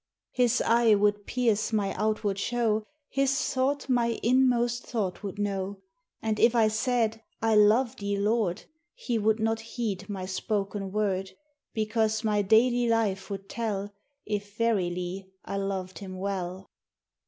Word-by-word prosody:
His 245 -1 +2
eye 230 -1 +5
would 205 0 +1
pierce 230 -3 +1
my 205 -3 0
outward 215 -2 -1
show, 220 -1 0 0.2
His 275 0 +1
thought 270 +2 0
my 235 -3 +1
inmost 245 -1 +3
thought 205 -7 -2
would 200 -1 -6
know; 200 -1 -2 0.5
And 220 -1 0
if 235 +1 +5
I 220 -2 +5
said, 225 0 0 0.2
"I 225 0 +2
love 225 +5 +4
thee, 200 -2 -2
Lord," 205 -3 0 0.3
He 245 - -2
would 220 +1 +2
not 225 0 +1
heed 225 -4 -4
my 190 -2 -4
spoken 195 +1 -2
word, 195 -2 0 0.5
Because 220 0 0
my 210 -1 +2
daily 240 +4 +4
life 215 -4 0
would 195 -1 -6
tell 205 -3 -3 0.3
If 205 0 -4
verily 190 -4 -1 0.2
I 195 - -3
loved 190 -2 -3
him 190 -2 -7
well. 190 -1 -4
215 Hz, 140 wpm, -28 LUFS, 195-230 Hz, 0.5 s, eye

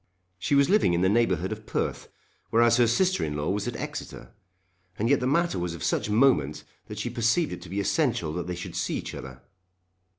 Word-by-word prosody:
She 140 - +1
was 140 0 +5
living 200 - +3
in 85 - +1
the 95 - +3
neighbourhood 95 -5 +1
of 110 0 -7
Perth, - - -2 0.4
whereas 115 +1 +4
her 120 -1 +4
sister 185 +11 +2
in 75 -1 -2
law 75 +4 -1
was 100 +2 -2
at 120 - -3
Exeter. - - -7 0.7
And 110 - 0
yet 140 +2 +4
the 125 - -1
matter 170 - +1
was 85 -1 -3
of 85 - -8
such - - 0
moment 105 - +2 0.2
that - - -8
she 120 - -3
perceived 120 +8 +1
it - - -8
to 90 - -11
be 100 +3 -3
essential 105 - 0
that 90 +1 -4
they 90 - -3
should 85 - -7
see - - -1
each - - -6
other. 65 -1 -9
110 Hz, 220 wpm, -26 LUFS, 90-125 Hz, 0.7 s, was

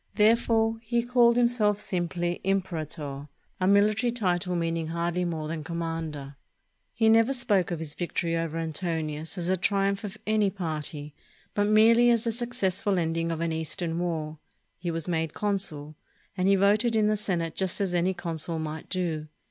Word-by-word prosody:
Therefore 225 +1 +3
he 235 +1 0
called 240 -1 +4
himself 235 -4 +3
sim 180 -4 -1
ply 175 0 -2
"imperator," 155 -7 -2 0.3
a 185 - +1
military 210 +4 +4
title 180 -5 0
meaning 165 -1 -1
hardly 170 +2 -1
more 160 -3 -3
than 155 -1 -4
commander. 165 -4 -5 0.5
He 225 -1 +1
never 225 +4 +5
spoke 205 -8 +2
of 175 - -2
his 155 -2 -5
victory 170 -1 -2
over 165 -1 -2
Antonius 160 0 -3
as 175 - -3
the 185 +1 +1
triumph 195 +2 +1
of 205 0 -6
any 215 -2 +2
party, 155 -5 -4 0.4
but 205 0 +1
merely 230 +3 +6
as 230 -2 +3
the 230 - 0
successful 205 -5 -1
ending 165 0 0
of 165 0 -3
an 170 -1 0
Eastern 160 +1 -2
war. 160 -3 -3 0.4
He 175 0 -3
was 165 0 -3
made 160 -2 -1
con 205 -1 0
sul; 150 -5 -5 0.4
and 185 -1 +1
he 195 - +5
voted 210 +4 +3
in 215 -1 +3
the 215 0 +3
Senate 175 -6 -2
just 190 -2 -1
as 195 -3 -1
any 180 +2 +1
consul 165 -1 -3
might 155 0 -5
do. 165 -4 -2
180 Hz, 170 wpm, -27 LUFS, 165-210 Hz, 0.5 s, merely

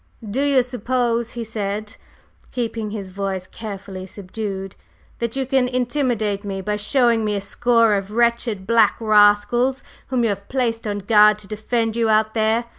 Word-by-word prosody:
"Do 230 +7 -2
you 280 -3 +3
suppose," 240 -1 -1
he 235 - -4
said, 215 0 -4 0.6
keeping 230 -3 -3
his 200 -3 -6
voice 190 -1 -3
carefully 195 -3 -8
subdued, 195 0 -6 0.4
"that 235 0 -2
you 270 -1 -1
can 265 -1 +2
intimidate 245 -5 -1
me 195 -1 -4
by 210 +2 -2
showing 235 +1 +2
me 210 -1 0
a - - -1
score 230 +2 +2
of 195 -1 -1
wretched 235 -3 0
black 225 -1 +4
rascals 215 +4 +3 0.2
whom 255 -2 0
you 230 - +2
have 200 0 -4
placed 230 -4 -1
on 205 -1 -2
guard 210 -1 +6
to 210 - -12
defend 225 +1 -2
you 230 -1 +1
out 215 0 +2
there? 220 +1 +1
220 Hz, 165 wpm, -21 LUFS, 205-240 Hz, 0.6 s, guard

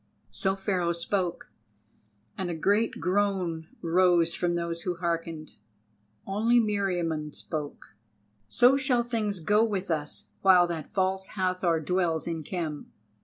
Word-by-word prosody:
So 190 - 0
Pharaoh 185 -3 0
spoke, 175 +1 -2 0.8
and 185 -2 -3
a 170 - -2
great 205 +8 +1
groan 180 -4 0 0.2
rose 170 -1 +3
from 175 0 0
those 170 0 -3
who 180 -1 -2
hearkened. 165 -2 -4 0.7
Only 225 +5 +3
Meriamun 175 -8 -1
spoke: 145 -8 -6 0.5
"So 245 - +5
shall 260 -3 +2
things 215 -5 -2
go 210 +7 +3
with 195 -5 -2
us 150 -2 -3
while 185 -2 +6
that 165 -3 -5
False 190 0 0
Hathor 185 -3 +1
dwells 170 -1 0
in 165 -2 -3
Khem." 155 -2 -5
180 Hz, 125 wpm, -28 LUFS, 165-195 Hz, 0.8 s, while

